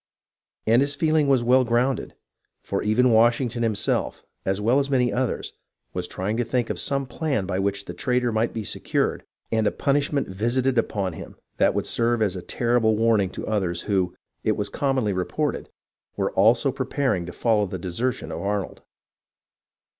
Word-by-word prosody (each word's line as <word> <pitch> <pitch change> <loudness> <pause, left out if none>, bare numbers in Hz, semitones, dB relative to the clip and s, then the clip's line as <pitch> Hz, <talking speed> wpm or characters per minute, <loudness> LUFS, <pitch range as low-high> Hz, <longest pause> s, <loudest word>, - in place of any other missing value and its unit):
And 115 +3 +4
his 140 +1 0
feeling 155 -1 +2
was 135 -3 +3
well 130 +2 +5
grounded, 120 +2 0 0.5
for 100 - -2
even 120 +4 +3
Washington 120 +1 +3
himself, 110 -3 -1 0.2
as 95 +1 +1
well 115 +6 +3
as 140 0 -1
many 125 -3 +2
others, 130 -1 -2 0.4
was 90 -1 -2
trying 100 +6 -3
to 120 - +1
think 120 0 -1
of - - -4
some 140 -1 -1
plan 135 -5 -2
by 95 0 -2
which 100 0 -1
the - - -6
traitor 125 -2 0
might 110 +1 +1
be 110 - -4
secured - - -1 0.3
and 110 -1 +2
a - - +2
punishment 140 0 0
visited 120 +6 +1
upon 100 -5 -1
him - - -9 0.2
that - - +3
would - - 0
serve 115 -1 +1
as 100 -3 0
a 90 - -5
terrible 115 0 +1
warning 110 -4 +3
to - - -7
others 90 -5 -1
who, 95 -4 0 0.3
it 110 - +2
was 105 -1 -2
commonly 130 -5 0
reported, 90 -1 -2 0.5
were - - 0
also 115 +7 +4
preparing 130 -8 -1
to - - -5
follow 105 0 +1
the 95 - -5
desertion 95 +9 -3
of - - -4
Arnold. 100 -1 -3
115 Hz, 175 wpm, -24 LUFS, 100-130 Hz, 0.5 s, well